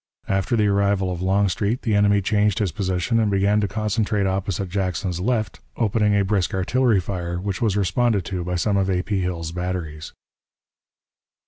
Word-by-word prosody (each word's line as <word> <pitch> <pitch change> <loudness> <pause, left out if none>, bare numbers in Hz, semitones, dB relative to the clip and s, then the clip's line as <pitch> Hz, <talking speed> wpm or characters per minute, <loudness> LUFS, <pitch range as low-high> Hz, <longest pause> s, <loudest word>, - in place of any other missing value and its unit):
After 95 +3 0
the 105 -2 +2
arrival 100 -2 +1
of 90 -1 -4
Longstreet 100 +4 0
the 110 - 0
enemy 100 0 +3
changed 105 -1 +2
his 100 -5 0
position 95 +5 0
and 110 -2 +2
began 100 +2 +2
to 100 - 0
concentrate 105 0 -1
opposite 95 0 -1
Jackson's 90 -1 -2
left, 110 +2 -1 0.2
opening 105 -2 +2
a 100 -1 +2
brisk 95 -2 0
artillery 115 +3 +2
fire, 85 -1 -4
which 95 0 -4
was 105 -4 +1
responded 100 +1 +1
to 90 -2 -3
by 90 +1 -3
some 100 +3 +1
of 95 0 +1
A. 90 -1 0
P. 100 -2 -1
Hill's 85 -3 -3
batteries. 85 -3 -4
100 Hz, 170 wpm, -22 LUFS, 90-105 Hz, 0.2 s, enemy